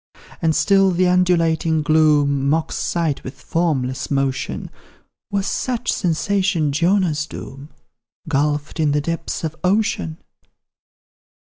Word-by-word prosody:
And 160 -1 +2
still 195 +5 +4
the 185 0 +2
undulating 165 -3 +2
gloom 145 -3 +3
Mocks 160 +2 0
sight 165 -5 -1
with 130 - -9
formless 140 -7 -1
motion: 135 -2 -2 0.6
Was 200 -1 -1
such 245 +1 -1
sensation 180 -2 0
Jonah's 165 -1 +1
doom, 135 +3 -9 0.6
Gulphed 145 +1 -1
in 150 -2 +2
the 150 - +1
depths 165 +3 -4
of 160 -1 -3
ocean? 180 - 0
160 Hz, 110 wpm, -20 LUFS, 145-180 Hz, 0.6 s, still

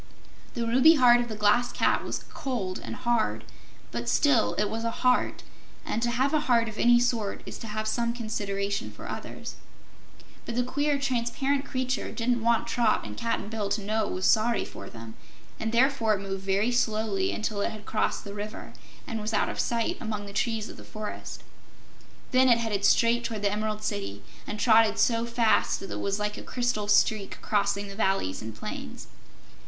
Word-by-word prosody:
The 235 -2 -1
ruby 260 +8 +6
heart 245 -3 +6
of 240 - -3
the 215 - -4
Glass 210 +4 +3
Cat - - +1
was - - -4
cold 235 -10 -3
and - - -6
hard, 220 - 0 0.5
but 120 0 -3
still 285 -6 +3
it 210 - +1
was 225 +2 -4
a 230 - 0
heart, 250 +2 +1 0.4
and 225 - -2
to 240 - +1
have 260 +4 +1
a 310 - +4
heart 230 -2 +4
of 220 -1 -7
any 240 0 +6
sort 235 -4 -1
is - - -7
to 225 - -7
have 215 0 -3
some 235 +1 0
consideration 200 -4 -3
for - - -10
others. - - -7 0.9
But 235 - -4
the 245 - +2
queer 285 +3 0
transparent 270 +1 0
creature 255 -1 -2
didn't 240 0 0
want 230 0 +2
Trot 230 - +1
and 105 0 -7
Cap'n 230 - -2
Bill 215 -2 -3
to 210 - 0
know 215 +1 0
it - - -4
was 185 - -2
sorry 225 -1 +3
for - - -9
them, 115 -1 -10 0.5
and 220 0 -2
therefore 235 -3 +3
it 195 - -5
moved 195 -1 -4
very 195 +5 +1
slowly 215 -5 0
until 215 -1 -2
it - - +1
had 215 -2 -9
crossed 215 - -1
the 200 - -7
river 210 +1 -7 0.3
and 225 -3 -4
was 215 +1 -2
out - - +2
of - - -5
sight 230 -1 0
among 215 -3 -4
the 200 - -9
trees 225 +1 -1
of - - -10
the - - -11
forest. 215 -1 -7 0.9
Then 255 0 +5
it 235 - +6
headed 215 -4 -1
straight 235 +1 +4
toward 220 -3 -4
the 200 - +2
Emerald 215 0 -2
City, 100 - -3 0.2
and 210 - -4
trotted 225 -1 +5
so 230 -1 +2
fast 235 -1 +2
that 195 - -8
it - - -4
was 200 0 -1
like 210 0 -3
a - - -7
crystal 240 -4 -1
streak 205 0 +2
crossing 205 -1 0
the 195 - -8
valleys 190 - 0
and 110 0 -7
plains. 75 -9 -7
220 Hz, 195 wpm, -27 LUFS, 205-240 Hz, 0.9 s, ruby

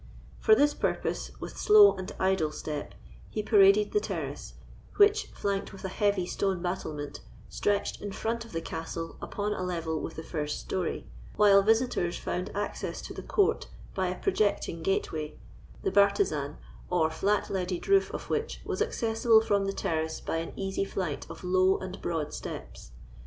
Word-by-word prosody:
For 435 - +6
this 295 -5 +4
purpose, - - -1
with - - -7
slow 420 -1 +8
and 185 +1 -6
idle 190 -5 +2
step, 150 -1 -5 0.3
he 215 - -3
paraded 205 -1 +5
the 420 - +3
terrace, - - -5 0.4
which, 420 +1 +5
flanked 200 -1 -3
with 195 - -9
a - - -2
heavy 200 -1 +1
stone 190 0 -1
battlement, 155 -5 -4 0.3
stretched 205 -1 -1
in 205 - -4
front 230 +3 -2
of 230 - -13
the 165 - -3
castle 165 0 -5
upon 210 0 -2
a 190 - -4
level 165 -4 -2
with 165 - -5
the 160 - -6
first 150 -2 -3
story; 185 -2 -3 0.3
while 200 -1 +6
visitors 220 -5 +1
found 180 +2 -3
access 205 0 -3
to - - -7
the - - -6
court 415 +2 +1 0.3
by 190 -1 0
a 180 0 -3
projecting 205 - 0
gateway, 160 -4 -1 0.5
the 190 - +1
bartizan 200 -8 +2 0.3
or 160 -3 +2
flat 200 +6 0
leaded 180 -2 -2
roof 390 0 +4
of - - -6
which 455 +1 -2
was - - -2
accessible 225 -1 +3
from 200 -3 +1
the 195 - 0
terrace 160 -5 -2
by - - -2
an 165 0 -4
easy 195 0 -2
flight 185 -6 -3
of - - -9
low 185 +1 +3
and 185 0 -7
broad 160 -3 -2
steps. - - -7
190 Hz, 170 wpm, -29 LUFS, 165-210 Hz, 0.5 s, slow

